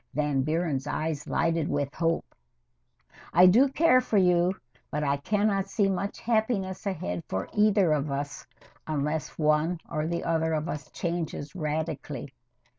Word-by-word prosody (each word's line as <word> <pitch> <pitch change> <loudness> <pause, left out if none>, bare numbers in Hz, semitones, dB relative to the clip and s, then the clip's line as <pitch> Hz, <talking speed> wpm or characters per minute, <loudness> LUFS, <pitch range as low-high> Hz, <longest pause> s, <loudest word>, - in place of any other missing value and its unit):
[Van 145 -2 +1
Buren's 155 -2 -1
eyes 155 -1 -2
lighted 165 -2 +1
with 145 0 -1
hope.] 165 +1 -1 1.0
I 180 +2 +8
do 230 +10 +6
care 275 -2 +4
for 230 -4 0
you, 180 0 +3 0.3
but 150 +1 -2
I 140 -1 +1
can 205 +8 0
not 195 -2 +1
see 205 -3 +2
much 195 +1 -2
happiness 215 -4 0
ahead 90 - -3
for 95 +1 -2
either 210 -5 +4
of 150 -1 +1
us 140 0 -4 0.4
unless 150 0 -2
one 155 +3 +2
or 155 -1 -2
the 170 0 -2
other 160 -1 +1
of 155 +1 -1
us 150 -4 -5
changes 165 -4 -4
radically. 150 -4 -4
160 Hz, 150 wpm, -27 LUFS, 150-190 Hz, 1.0 s, I